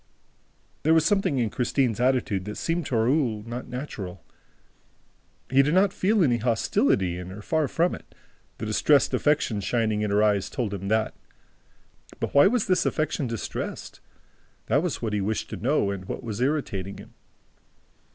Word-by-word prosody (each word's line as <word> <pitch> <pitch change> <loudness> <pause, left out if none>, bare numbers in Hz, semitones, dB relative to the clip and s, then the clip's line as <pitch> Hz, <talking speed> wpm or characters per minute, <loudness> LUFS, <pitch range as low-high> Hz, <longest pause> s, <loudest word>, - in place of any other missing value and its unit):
There 160 +2 +4
was 160 -1 +4
something 195 -7 +2
in 115 -4 0
Christine's 125 -2 0
attitude 125 -7 +1
that 105 0 -6
seemed 165 -2 -1
to 125 - -2
Raoul 115 -2 +1
not 120 +2 -6
natural. 105 - -7 1.3
He 135 +1 +6
did 150 +5 +1
not 195 +1 +4
feel 205 0 +2
any 120 -6 +3
hostility 100 -6 +1
in 90 0 -7
her; 100 +3 -9
far 155 +3 +1
from 170 +6 +1
it: - - -11 0.4
the 110 - -5
distressed 140 +7 +3
affection 145 -8 +1
shining 110 +2 0
in 105 - 0
her 105 +1 +3
eyes 105 -2 +2
told 120 -7 -3
him 100 0 -5
that. 110 +1 +1 1.1
But - - -3
why 140 +4 +7
was 235 +1 +1
this 185 -1 +2
affection 155 -3 -1
distressed? 115 -4 -5 0.7
That 145 - +2
was 175 -7 -3
what 110 -2 -1
he 105 - 0
wished 105 +3 -2
to - - -3
know 120 -5 +1
and 95 -1 -6
what - - -6
was 110 0 -4
irritating 115 -9 -1
him. - - -13
120 Hz, 170 wpm, -25 LUFS, 105-150 Hz, 1.3 s, why